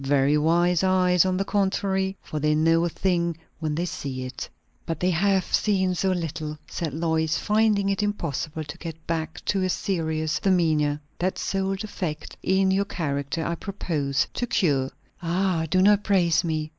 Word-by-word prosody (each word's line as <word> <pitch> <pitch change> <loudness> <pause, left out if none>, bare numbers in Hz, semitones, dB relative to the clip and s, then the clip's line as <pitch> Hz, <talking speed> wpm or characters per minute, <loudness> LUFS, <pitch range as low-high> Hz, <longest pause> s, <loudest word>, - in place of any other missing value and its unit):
"Very 140 +1 +3
wise 170 +4 +3
eyes, 185 -1 +4
on 185 0 0
the 195 - 0
contrary! 195 -1 0
for 155 - -4
they 150 +1 +2
know 165 +2 +3
a - - 0
thing 170 -2 0 0.2
when 155 -2 -2
they 170 +3 -1
see 135 -6 -4
it." 130 +1 -6 0.3
"But 165 -2 -4
they 180 +1 +2
have 190 +2 +1
seen 190 -3 +2
so 190 +2 0
little," 155 -3 -3
said 165 -3 -3
Lois, 160 +1 0
finding 210 -2 +2
it 195 +1 0
impossible 165 -6 -2
to 145 - -8
get 165 -1 -8
back 165 0 -3
to 195 - +1
a 185 - +1
serious 160 -5 -1
demeanour. 155 -6 +2 0.2
"That 185 +1 0
sole 195 0 -1
defect 185 -6 -5
in 190 0 +2
your 195 +1 +2
character, 145 -3 -2
I 170 - -1
propose 155 -7 -1
to 245 - -2
cure." 140 - +1 0.3
"Ah, 175 -1 0
do 185 +2 +3
not 205 +1 +5
praise 175 -4 +3
me!" 155 -2 -1
170 Hz, 170 wpm, -25 LUFS, 155-190 Hz, 0.3 s, not